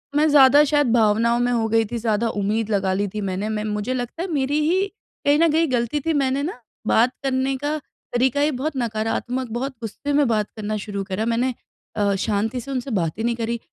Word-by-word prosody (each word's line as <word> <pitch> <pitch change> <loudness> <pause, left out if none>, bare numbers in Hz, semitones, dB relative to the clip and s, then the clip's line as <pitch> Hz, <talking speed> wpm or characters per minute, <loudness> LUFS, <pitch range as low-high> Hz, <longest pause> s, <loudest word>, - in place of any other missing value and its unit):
मैं 305 +1 +4
ज़्यादा 285 0 +7
शायद 290 -3 +3
भावनाओं 230 +1 +3
में 245 0 +1
हो 225 -2 +1
गई 225 0 +3
थी 240 - -2
ज़्यादा 230 0 0
उम्मीद 210 +2 -1
लगा 195 -2 +1
ली 200 +1 0
थी 210 +2 -5
मैंने, 195 +2 -2
मैं 215 -1 -2
मुझे 210 +3 -2
लगता 250 +6 -4
है - - -3
मेरी 285 +1 +1
ही 380 +3 +2 0.4
कहीं 285 +1 +5
न 335 -1 +5
कहीं 320 -3 +2
गलती 240 +4 0
थी 325 - +2
मैंने 275 0 +1
ना, 310 -5 -4 0.3
बात 240 +3 +4
करने 265 0 0
का 295 +3 -2 0.4
तरीका 260 +3 +2
ही 300 +1 +3
बहुत 285 +4 -3
नकारात्मक 240 +2 -2
बहुत 265 +3 -3
गुस्से 285 +6 -4
में 285 -2 +3
बात 215 -2 0
करना 215 0 -3
शुरू 200 -1 -4
करा। 195 +3 -3
मैंने 240 +2 0 0.4
अ, 200 -2 +1
शांति 215 +5 -1
से 275 - -8
उनसे 255 0 -3
बात 170 -4 -1
ही 225 - -3
नहीं 235 0 +1
करी। 230 0 -2
235 Hz, 220 wpm, -22 LUFS, 215-275 Hz, 0.4 s, ज़्यादा